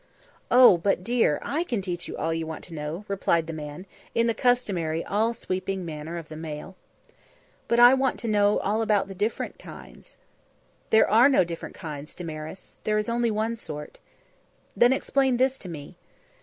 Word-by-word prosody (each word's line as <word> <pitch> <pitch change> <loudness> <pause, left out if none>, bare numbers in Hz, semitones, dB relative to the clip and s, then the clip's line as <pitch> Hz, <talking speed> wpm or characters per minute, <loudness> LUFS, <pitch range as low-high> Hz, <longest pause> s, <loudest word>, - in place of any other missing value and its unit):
"Oh! 245 -8 +7
but, 180 0 0
dear, 230 -8 +2
I 315 +4 -1
can 245 -11 -2
teach 180 -2 -4
you - - -6
all 165 +1 -1
you 165 0 -3
want 160 - -7
to 170 - -9
know," 155 +6 -5
replied 170 -4 +1
the 165 - -6
man, 150 +3 -7 0.3
in 230 - +3
the 230 - +2
customary 195 -10 0
all 220 +4 0
sweeping 185 -3 -3
manner 160 +1 -6
of 165 -2 -7
the 155 - -9
male. 155 +3 -7 0.9
"But 235 - +2
I 245 +1 +9
want 265 0 +1
to 235 - -4
know 205 -1 +3
all 210 +3 0
about 210 -3 +1
the - - -6
different 205 +4 -3
kinds." - - -13 0.7
"There 220 - +5
are 235 +6 +6
no 265 - +4
different 170 -1 -7
kinds, 150 -3 -8
Damaris. 160 +1 -8
There 215 0 +1
is 215 +1 -1
only 235 0 +1
one 220 +2 -1
sort." 150 -9 -8 0.8
"Then 240 +1 +5
explain 265 -1 +1
this 265 +1 +1
to 185 - -7
me." 150 -4 -9
195 Hz, 185 wpm, -26 LUFS, 165-230 Hz, 0.9 s, I